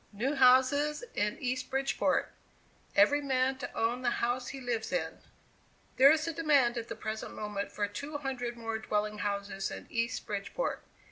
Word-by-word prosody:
"NEW 235 +7 -1
HOUSES 270 - +4
IN 210 0 0
EAST 255 0 -2
BRIDGEPORT. 270 +1 +1 0.6
"EVERY 245 +9 +5
MAN 265 -1 +1
TO 250 - -5
OWN 235 +2 0
THE 250 - +2
HOUSE 245 +1 -1
HE 275 - -6
LIVES 240 -3 -2
IN. 160 -3 -2 0.8
"There 270 +2 +9
is 315 +2 +3
a 330 - -1
demand 285 -7 +3
at 235 -1 -4
the - - -5
present 220 0 -5
moment 210 -1 -4
for 205 -1 -1
two 280 +9 -5
hundred 250 -4 -4
more 225 -1 -3
dwelling 210 -1 -1
houses 200 -1 -2
in - - -7
East 230 0 -1
Bridgeport. 205 - -3
245 Hz, 165 wpm, -31 LUFS, 210-270 Hz, 0.8 s, There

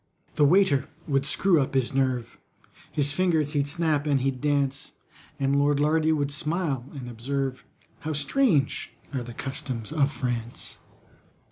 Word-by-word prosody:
The 145 - +4
waiter 165 -3 +4 0.2
would 140 -2 +1
screw 175 -4 +3
up 135 - -3
his 130 -1 +1
nerve, 130 -3 -1 0.5
His 145 0 +1
fingers 160 -4 +1
he'd 145 -1 0
snap 155 -1 +1
and 140 -3 +2
he'd 130 -1 -1
dance— 140 -2 0 0.5
And 140 +1 +2
LORD 145 0 +2
LARDY 155 +2 +3
would 145 -2 0
smile 150 -3 -2
and 130 -3 -6
observe, 130 +2 -3 0.3
"How 155 - -3
strange 150 - +1 0.2
are 130 - -1
the 120 -1 -8
customs 135 -4 -3
of 145 -3 +2
France!" 120 -4 -3
140 Hz, 145 wpm, -26 LUFS, 135-150 Hz, 0.5 s, The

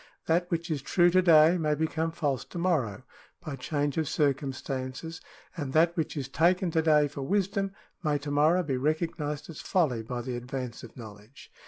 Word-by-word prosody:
That 175 +2 +1
which 170 0 -2
is 145 -3 -1
true 175 +5 +3
to 185 +1 +5
day 165 0 +6
may 150 -2 +1
become 160 +1 -1
false 145 -5 -1
to - - -9
morrow 145 - 0 0.4
by 155 -5 -6
change 145 +2 -1
of 155 - -1
cir 145 -3 +3
cumstances, 135 +3 -5 0.3
and 145 -6 -4
that 170 +2 +4
which 160 -1 -2
is 135 -3 -3
taken 175 +5 +2
to 160 - +2
day 150 -2 +4
for 140 0 -7
wisdom 195 +4 0 0.3
may 150 -2 +1
to 145 0 -6
morrow 155 +5 +3
be 135 -5 -1
recognised 150 +1 -2
as 155 - -9
folly 150 -11 +1
by 120 +2 -5
the 125 0 -4
advance 125 -1 -5
of 120 - -12
know 110 -3 -8
ledge. 105 +7 -17
150 Hz, 195 wpm, -28 LUFS, 135-170 Hz, 0.4 s, day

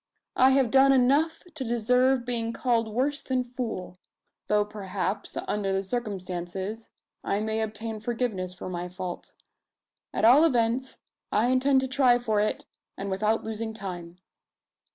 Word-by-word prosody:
I 260 - +6
have 265 -4 +3
done 270 0 +6
enough 280 +5 +3
to 305 -4 -5
deserve 250 +2 +2
being 230 -2 -2
called 235 -3 +1
worse 275 +6 0
than 255 -1 -1
fool; 235 -7 -5 0.5
though 210 0 +3
perhaps, 200 -1 -4
under 205 -2 -1
the 195 0 0
circumstances, 190 -1 -4 0.3
I 200 - 0
may 220 +1 -1
obtain 220 0 -4
forgiveness 220 -5 -2
for 180 - -8
my 180 -1 -4
fault. 180 -1 -7 0.8
At - - +1
all 260 +7 +8
events, 250 -3 +1 0.3
I 220 +4 +2
intend 265 +1 +3
to 265 - -2
try 260 -2 +4
for 220 -4 0
it, 210 +1 -1 0.3
and 195 0 -4
without 215 +3 +1
losing 220 0 -4
time." 180 -4 -7
225 Hz, 145 wpm, -27 LUFS, 200-250 Hz, 0.8 s, all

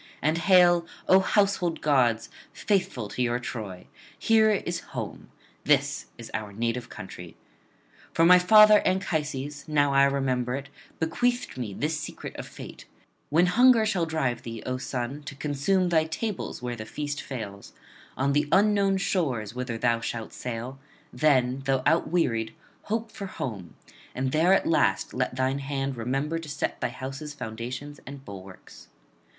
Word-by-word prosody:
and 155 +3 +1
hail, 175 -1 +5 0.2
O 190 - +7
household 190 -3 +1
gods, 125 -6 +2 0.3
faithful 180 - -1
to 105 - -4
your 120 -1 +1
Troy! 110 -7 -6 0.3
here 220 -1 +4
is 185 -4 -1 0.2
home; - - -6 0.3
this - - +1
is - - -10
our 110 -1 -4
native 115 +3 -2
country. 90 -3 -10 0.7
For 165 - +3
my 180 +1 +8
father 215 +3 +8
Anchises, 150 -6 -2
now 145 -2 +2
I 140 0 +6
remember 130 -3 0
it, 140 0 -6 0.3
bequeathed 245 +10 0
me 115 -7 -5
this 155 +1 -1
secret - - -7
of - - -6
fate: - - -11 0.4
"When 165 +4 +4
hunger 230 +4 +5
shall 185 -6 0
drive 145 -7 -1
thee, 115 -1 -7
O 130 0 -2
son, 130 +2 -4
to 140 - -7
consume 150 +7 0
thy 160 -2 +3
tables 185 - -4
where 120 -1 -3
the 110 -2 -7
feast 145 +2 -4
fails, 105 -6 -7 0.4
on 140 +2 +1
the 145 +1 +2
unknown 200 -1 +4
shores 130 - -1
whither 125 -2 -4
thou 115 0 +1
shalt 115 -1 -5
sail; 125 +2 -5 0.3
then, 130 -3 +2
though 135 -1 +1
outwearied, 155 -9 +1 0.3
hope 225 +1 -2
for 200 - -6
home, 105 - -6 0.4
and 130 +1 -1
there 160 +5 +3
at - - 0
last 160 -3 +1
let 125 0 -1
thine 130 +1 0
hand 135 -1 -3
remember 135 +7 -2
to 165 -2 -9
set 150 0 -3
thy - - 0
house's 135 +4 -7
foundations 125 +5 -6
and 140 0 -9
bulwarks." 95 -1 -12
140 Hz, 155 wpm, -27 LUFS, 125-175 Hz, 0.7 s, my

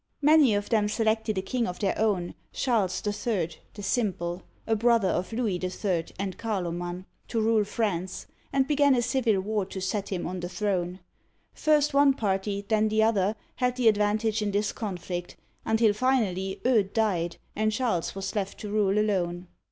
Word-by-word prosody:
Many 295 -6 +6
of 205 0 -2
them 215 -3 +2
selected 220 -1 0
a 190 - -1
king 235 +4 -1
of 180 - -4
their 200 -3 0
own, 200 -5 0 0.2
Charles 215 -8 0
HI., 205 -4 -1 0.3
the 205 - -8
Simple 185 -5 -1 0.2
(a 225 - +1
brother 230 -3 +3
of 180 +4 -1
Louis 225 -5 0
IH. 180 -1 -2
and 190 -1 -4
Carloman), 175 -4 -3 0.2
to 230 - -1
rule 220 -1 +3
France, 190 -4 -2 0.3
and 270 -1 +2
began 285 -2 +4
a 240 - +1
civil 235 -4 +1
war 210 +1 -1
to 195 - -6
set 195 +2 -2
him 185 -3 -3
on 180 +1 -4
the 175 0 -4
throne. 185 -1 -2 0.5
First 300 -1 +2
one 280 -1 +5
party, 200 -2 -1
then 215 -1 +3
the 215 0 +3
other, 210 -2 +2 0.2
had 250 -1 +1
the 250 -2 +2
advantage 215 +1 +2
in 210 - 0
this 205 +1 0
conflict, 180 -4 -5 0.3
until 220 -1 +3
finally 205 -6 0
Eudes 215 -6 +3
died 185 -7 0 0.2
and 215 0 +1
Charles 215 -8 -1
was 195 0 -4
left 200 -2 -2
to 210 - -5
rule 205 -1 +2
alone. 180 -4 0
210 Hz, 175 wpm, -27 LUFS, 190-225 Hz, 0.5 s, Many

